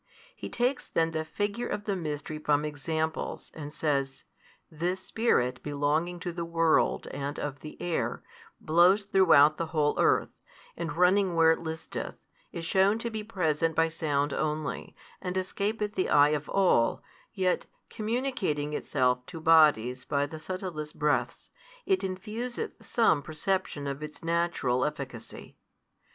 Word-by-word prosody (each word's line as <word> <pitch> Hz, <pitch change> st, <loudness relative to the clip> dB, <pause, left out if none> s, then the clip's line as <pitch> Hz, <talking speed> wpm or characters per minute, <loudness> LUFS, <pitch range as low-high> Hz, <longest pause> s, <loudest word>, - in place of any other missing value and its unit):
He -, -, -7 dB
takes 250 Hz, +2 st, -1 dB
then 165 Hz, 0 st, +1 dB
the 160 Hz, -1 st, -2 dB
figure 205 Hz, +8 st, -2 dB
of 210 Hz, -, -3 dB
the 205 Hz, -1 st, -1 dB
mystery 155 Hz, -3 st, -4 dB
from 150 Hz, -1 st, +1 dB
examples, 160 Hz, +2 st, -3 dB
and 150 Hz, -2 st, -7 dB
says, 140 Hz, -3 st, -1 dB, 0.5 s
This 175 Hz, +4 st, -2 dB
spirit 130 Hz, -, 0 dB
belonging 150 Hz, +4 st, -1 dB
to 175 Hz, -, -3 dB
the 170 Hz, 0 st, -4 dB
world 165 Hz, -1 st, +2 dB
and 140 Hz, +1 st, -4 dB
|170 -, -, -7 dB
of 140 Hz, -1 st, -9 dB
the 155 Hz, +2 st, -10 dB
air, 175 Hz, -2 st, -2 dB, 0.4 s
blows 175 Hz, +6 st, +4 dB
throughout 165 Hz, -7 st, +5 dB
the 165 Hz, -, -2 dB
whole 150 Hz, -2 st, +1 dB
earth, -, -, +3 dB, 0.4 s
and 165 Hz, -3 st, -4 dB
running 180 Hz, 0 st, +4 dB
where 165 Hz, -1 st, +6 dB
it 160 Hz, -, +1 dB
listeth, 160 Hz, -1 st, -5 dB, 0.4 s
is 165 Hz, -, -5 dB
shewn 195 Hz, +5 st, +3 dB
to 235 Hz, +1 st, -4 dB
be 215 Hz, -1 st, -4 dB
present 165 Hz, -6 st, 0 dB
by 165 Hz, 0 st, +3 dB
sound 145 Hz, -3 st, -1 dB
only, 155 Hz, 0 st, -3 dB, 0.3 s
and 180 Hz, 0 st, -3 dB
escapeth 210 Hz, +3 st, -2 dB
the 185 Hz, -, 0 dB
eye 145 Hz, 0 st, +6 dB
of 150 Hz, -1 st, -2 dB
all, 180 Hz, -12 st, +2 dB, 0.3 s
yet, 185 Hz, -2 st, 0 dB, 0.2 s
communicating 215 Hz, -, -1 dB
itself 125 Hz, -3 st, +1 dB
to 165 Hz, -, -8 dB
bodies 150 Hz, -7 st, +4 dB
by 140 Hz, 0 st, 0 dB
the 155 Hz, +2 st, -8 dB
subtlest 165 Hz, -3 st, -5 dB
breaths, 150 Hz, -1 st, -1 dB, 0.3 s
it 385 Hz, -1 st, +2 dB
infuseth 220 Hz, -, -4 dB
some 220 Hz, -11 st, +3 dB
perception 155 Hz, -1 st, -2 dB
of 140 Hz, +1 st, -4 dB
its 150 Hz, +2 st, -8 dB
natural 165 Hz, -7 st, +1 dB
efficacy. 135 Hz, -6 st, -6 dB
160 Hz, 145 wpm, -29 LUFS, 150-190 Hz, 0.5 s, where